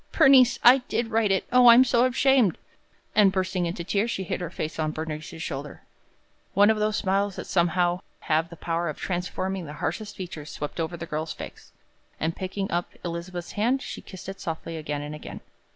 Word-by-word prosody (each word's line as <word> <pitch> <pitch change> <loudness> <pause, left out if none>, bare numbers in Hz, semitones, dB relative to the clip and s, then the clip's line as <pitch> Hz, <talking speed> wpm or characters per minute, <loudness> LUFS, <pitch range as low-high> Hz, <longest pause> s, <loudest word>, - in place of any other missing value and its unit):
"Bernice, 260 -2 +6
I 250 +3 +8
did 230 -1 -1
write 220 -2 +2
it. 190 - +1
O, 250 0 +6
I 235 - +10
am 255 - +8
so 245 -1 +3
ashamed!" 255 - +3 0.6
and, 205 -2 +5
bursting 185 -2 -1
into 170 0 -4
tears, 200 +6 0
she 195 -4 -2
hid 180 - -3
her 175 - -3
face 160 -2 -5
on 155 -1 0
Bernice's 155 +1 -5
shoulder. 145 -1 -6 0.7
One 205 +2 +6
of 220 - 0
those 215 0 +1
smiles 195 0 0
that - - -6
somehow 175 0 +1 0.2
have 160 +1 +1
the 170 - -10
power 170 0 -2
of 150 - -5
transforming 185 0 -3
the 150 - -7
harshest 200 +6 -4
features, 165 -5 -7
swept 150 +2 -6
over 165 +1 -2
the 170 - -6
girl's 155 0 -3
face, - - -10 0.5
and, 165 +1 -1
picking 195 +1 -4
up 175 +1 -1 0.2
Elizabeth's 175 +1 -5
hand, 245 +6 0
she - - -7
kissed 185 -2 -11
it 195 0 -7
softly 165 0 -5
again 150 -2 -4
and 150 +1 -6
again. 150 - -8
180 Hz, 200 wpm, -26 LUFS, 165-210 Hz, 0.7 s, I